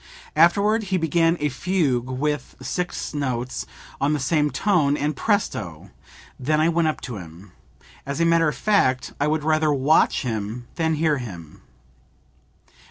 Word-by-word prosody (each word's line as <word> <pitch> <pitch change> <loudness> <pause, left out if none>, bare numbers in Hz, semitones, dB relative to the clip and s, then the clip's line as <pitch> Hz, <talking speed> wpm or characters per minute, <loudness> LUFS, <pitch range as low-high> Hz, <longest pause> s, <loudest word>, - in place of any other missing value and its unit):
Afterward 205 +5 +4
he 190 -1 0
began 165 +1 +2
a 150 - 0
fugue 135 -5 0
with 145 +3 -2
six 175 +7 -4
notes 130 -4 -3 0.3
on 145 +2 +2
the 150 - 0
same 150 +2 +1
tone, 150 -6 +2
and 150 +1 -1
Presto! 100 - -2 0.5
Then 150 +4 +1
I 160 +2 +3
went 170 -1 +2
up 155 - -2
to 125 -5 -6
him. 90 +2 -12 0.5
As 140 +2 -4
a 165 - +3
matter 165 -1 +4
of - - -5
fact 130 -12 +1
I 145 - +2
would 155 0 0
rather 155 0 +2
watch 145 +3 +3
him 115 0 -4
than 160 -1 0
hear 155 -2 +1
him." 85 -10 -9
150 Hz, 155 wpm, -23 LUFS, 125-165 Hz, 0.5 s, Afterward